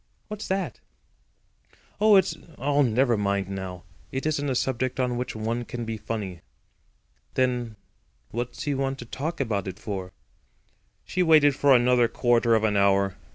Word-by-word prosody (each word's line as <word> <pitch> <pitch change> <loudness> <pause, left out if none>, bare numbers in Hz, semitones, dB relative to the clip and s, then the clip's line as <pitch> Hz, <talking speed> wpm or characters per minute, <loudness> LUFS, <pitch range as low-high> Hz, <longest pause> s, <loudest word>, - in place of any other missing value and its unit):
"What's 210 0 -6
that?" 190 0 -2 1.2
"Oh, 215 0 +6
it's—oh, 145 -6 +1
never 120 -1 +3
mind 100 -1 -1
now. 95 -2 -6 0.3
It 135 +2 -3
isn't 145 -2 0
a 130 - 0
subject 130 0 -1
on 125 -1 +1
which 125 -1 -4
one 115 +2 -2
can 120 0 -6
be 115 0 -3
funny." 105 -5 -5 0.9
"Then 125 -3 0 0.6
what's 120 +2 -4
he 145 - 0
want 135 0 -1
to 120 - -8
talk 155 +8 -4
about 105 -7 -1
it 95 0 -5
for?" 95 -4 -5 0.9
She 185 - -1
waited 155 -5 +5
for 140 -1 +5
another 120 -1 +4
quarter 120 0 +2
of 110 - +1
an 105 -2 +2
hour. 100 -1 +3
120 Hz, 155 wpm, -26 LUFS, 105-135 Hz, 1.2 s, Oh